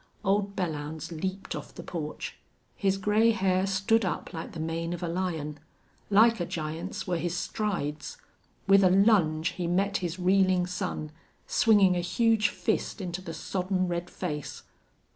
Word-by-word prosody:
Old 200 0 +1
Belllounds 155 -3 -3
leaped 190 +1 -3
off - - -8
the - - -8
porch. 155 -3 -5 0.4
His 195 -1 +1
gray 210 +4 +3
hair 190 -3 +2
stood 210 +4 +2
up 185 0 -3
like 165 -1 -6
the 165 - -6
mane 165 +1 -2
of 175 0 -5
a - - -1
lion. 165 -4 -3 0.5
Like 225 +2 +5
a 175 - -1
giant's 165 +5 -4
were 175 -2 -1
his 175 +1 -2
strides. 195 - -3 0.5
With 195 0 +6
a 185 - +6
lunge 180 -5 +4
he 180 -1 -4
met 195 +3 +1
his 175 -1 -3
reeling 185 0 +3
son, 180 -4 -4 0.3
swinging 205 -5 +4
a - - +1
huge 220 +5 +2
fist 220 - -2
into 185 -1 -4
the 165 -3 -7
sodden 185 -1 -1
red 175 0 -3
face. 150 -6 -5
185 Hz, 160 wpm, -28 LUFS, 170-195 Hz, 0.5 s, With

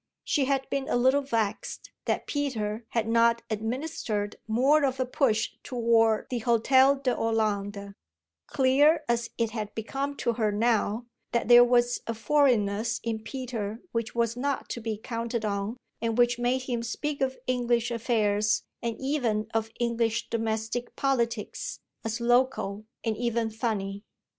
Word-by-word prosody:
She 285 -3 +1
had 270 0 0
been 275 -1 -1
a - - +1
little 260 +3 +4
vexed 225 -6 -2
that - - -1
Peter 230 -7 -2
had 230 -2 -1
not 230 0 +3
administered 220 -2 -2
more 270 +7 +4
of 265 -1 0
a 255 - +1
push 245 -4 +1
toward 230 -3 +2
the 245 -2 -1
Hôtel 260 +4 +4
de 255 -2 +2
Hollande, 205 -3 -1 0.5
clear 290 +5 +4
as 235 0 0
it 230 -2 0
had 215 -2 -5
become 275 +6 -3
to 235 - 0
her 215 -2 +1
now 225 +1 +1 0.3
that 235 0 0
there 240 0 +10
was 245 0 +2
a 230 - -2
foreignness 230 -4 +2
in 225 -1 -2
Peter 225 -3 -5
which 230 0 -3
was 235 -1 +1
not 275 +2 -2
to 235 - -4
be 220 -1 -3
counted 230 0 -3
on 200 +3 -2 0.2
and 230 0 -1
which 240 0 +3
made 250 +2 +1
him 245 -2 -2
speak 280 +5 -3
of 265 -1 0
English 240 -1 +1
affairs 215 -3 +1 0.2
and 230 -2 -3
even 245 -7 0
of 225 0 0
English 230 -1 0
domestic 225 +1 -2
politics 235 -5 -1 0.2
as 225 +1 -2
local 235 -4 +1 0.2
and 225 -2 0
even 235 -1 0
"funny." 205 -3 -3
235 Hz, 150 wpm, -27 LUFS, 220-255 Hz, 0.5 s, there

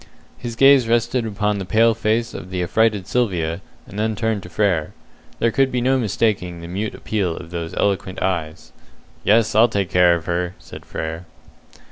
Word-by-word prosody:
His 120 -2 -6
gaze 135 -1 +6
rested 120 +1 +1
upon 105 -1 -1
the - - -3
pale 115 +5 +3
face 115 +1 -1
of 90 - -8
the 90 -1 -2
affrighted 105 +1 +1
Sylvia, 90 -7 -1 0.2
and 100 - -8
then 110 0 0
turned 110 -1 -1
to 90 - -11
Frere. 90 -5 0 0.4
There 115 - +1
could 135 +2 +2
be 125 - 0
no 130 +2 +2
mistaking 100 -6 -1
the 85 - -8
mute 100 +5 -4
appeal 95 -6 -2
of 85 -1 -10
those 85 -1 -5
eloquent 95 -2 -1
eyes. 80 -4 -3 0.5
"Yes, 110 +1 +3
I'll 115 +3 +5
take 100 -4 -2
care 90 -1 +5
of 85 - -6
her," 90 +1 -2
said - - -12
Frere. 80 +2 -5
100 Hz, 180 wpm, -21 LUFS, 90-115 Hz, 0.5 s, gaze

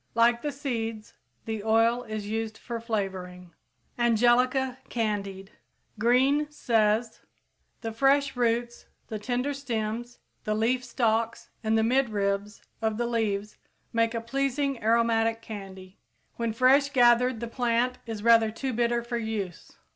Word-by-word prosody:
Like 235 +1 +4
the 295 - -2
seeds, 230 -6 -4 0.3
the 220 -2 -4
oil 225 +2 +3
is 215 -2 -5
used 220 +1 -3
for 235 -1 -5
flavoring. 190 -5 -4 0.5
Angelica 245 +3 +3
candied. 200 -4 -3 0.5
Green 265 +6 +3
says: 225 -4 +1 0.6
The 225 - -4
fresh 275 +4 +2
roots, 235 0 -1 0.2
the 215 - -4
tender 250 +6 -1
stems, 240 -3 -4 0.3
the 215 - -1
leaf 240 +4 +1
stalks 230 -1 -1
and 220 0 +2
the 220 - +3
midribs 210 -5 0 0.2
of 220 -1 0
the 240 - 0
leaves 215 -3 -1 0.4
make 230 0 +1
a 230 - -1
pleasing 275 +2 -1
aromatic 225 0 +2
candy. 195 -3 -9 0.4
When 230 -1 -1
fresh 260 +5 +4
gathered 245 -2 +4
the 235 - -4
plant 245 +1 0
is 220 -2 -5
rather 230 -1 +6
too 255 +4 -4
bitter 235 0 +1
for 235 0 -3
use. 215 -6 -5
230 Hz, 130 wpm, -27 LUFS, 220-245 Hz, 0.6 s, rather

